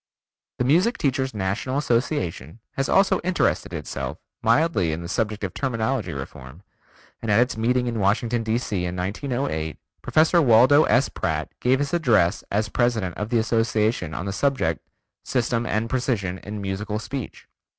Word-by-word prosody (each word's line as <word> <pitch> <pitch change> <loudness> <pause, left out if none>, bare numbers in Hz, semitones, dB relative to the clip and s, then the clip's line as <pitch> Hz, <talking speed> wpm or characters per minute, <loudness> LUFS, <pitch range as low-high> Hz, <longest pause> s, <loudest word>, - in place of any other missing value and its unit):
The - - 0
Music 180 - +3
Teacher's 130 -1 0
National 105 +7 -2
Association 115 - -1
has 135 - -1
also 195 -1 +4
interested 180 0 0
itself - - -5 0.2
mildly 115 - +2
in 85 +2 -5
the - - -6
subject 110 +2 -2
of 95 -2 -3
terminology 125 -2 -1
reform, 70 +3 -9 0.6
and 115 - -4
at 105 +2 +4
its 125 +1 +2
meeting 125 +3 +1
in 115 -2 -2
Washington, 115 +4 +1
D.C., 110 -4 -1
in 90 0 -3
1908, 95 - -3 0.2
Professor 160 +2 +3
Waldo 130 +4 +6
S. 125 +5 +3
Pratt 80 -4 -3
gave 130 +2 +3
his 145 +2 -2
address 120 - +2
as 105 +2 0
president 110 -5 0
of 105 +1 -4
the 120 - +2
Association 110 -6 0
on 85 - -4
the 100 - -3
subject 130 - 0 0.4
"System 120 -2 0
and 110 +2 0
Precision 110 -8 -1
in 105 +1 -7
Musical 100 +2 -3
Speech." 125 +3 -6
115 Hz, 155 wpm, -24 LUFS, 95-130 Hz, 0.6 s, Waldo